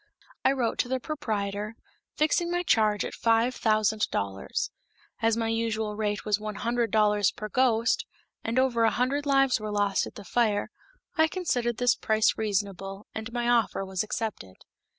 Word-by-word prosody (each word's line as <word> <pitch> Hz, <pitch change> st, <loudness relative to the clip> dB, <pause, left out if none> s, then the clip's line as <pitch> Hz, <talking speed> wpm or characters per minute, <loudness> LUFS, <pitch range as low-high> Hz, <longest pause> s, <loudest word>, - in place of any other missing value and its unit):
I -, -, +5 dB
wrote 250 Hz, -4 st, -1 dB
to -, -, +1 dB
the 260 Hz, +1 st, -1 dB
proprietor, 210 Hz, -7 st, -3 dB, 0.4 s
fixing 330 Hz, +3 st, +2 dB
my 350 Hz, 0 st, 0 dB
charge 215 Hz, -8 st, +2 dB
at -, -, -5 dB
five 230 Hz, +2 st, +2 dB
thousand 215 Hz, -2 st, +1 dB
dollars. 95 Hz, -1 st, -2 dB, 0.5 s
As 225 Hz, 0 st, +2 dB
my 225 Hz, -1 st, 0 dB
usual 220 Hz, -2 st, -1 dB
rate 210 Hz, -1 st, -2 dB
was 210 Hz, -1 st, +1 dB
one 215 Hz, 0 st, -5 dB
hundred 235 Hz, +2 st, 0 dB
dollars 210 Hz, -2 st, +3 dB
per 215 Hz, -, -7 dB
ghost, 235 Hz, -1 st, +2 dB, 0.4 s
and 230 Hz, +2 st, -2 dB
over 255 Hz, -3 st, +3 dB
a 225 Hz, -, +5 dB
hundred 275 Hz, +5 st, 0 dB
lives 270 Hz, -3 st, +3 dB
were 215 Hz, 0 st, -4 dB
lost 205 Hz, -1 st, +1 dB
at -, -, -12 dB
the 205 Hz, -, -10 dB
fire, 215 Hz, -1 st, +1 dB, 0.5 s
I 320 Hz, 0 st, +5 dB
considered 245 Hz, -, -1 dB
this 245 Hz, 0 st, +4 dB
price 220 Hz, 0 st, +2 dB
reasonable, 195 Hz, -1 st, -3 dB
and 220 Hz, +1 st, -5 dB
my 240 Hz, 0 st, -1 dB
offer 235 Hz, -4 st, +2 dB
was 190 Hz, -1 st, -2 dB
accepted. 215 Hz, -, -4 dB
220 Hz, 170 wpm, -27 LUFS, 210-245 Hz, 0.5 s, I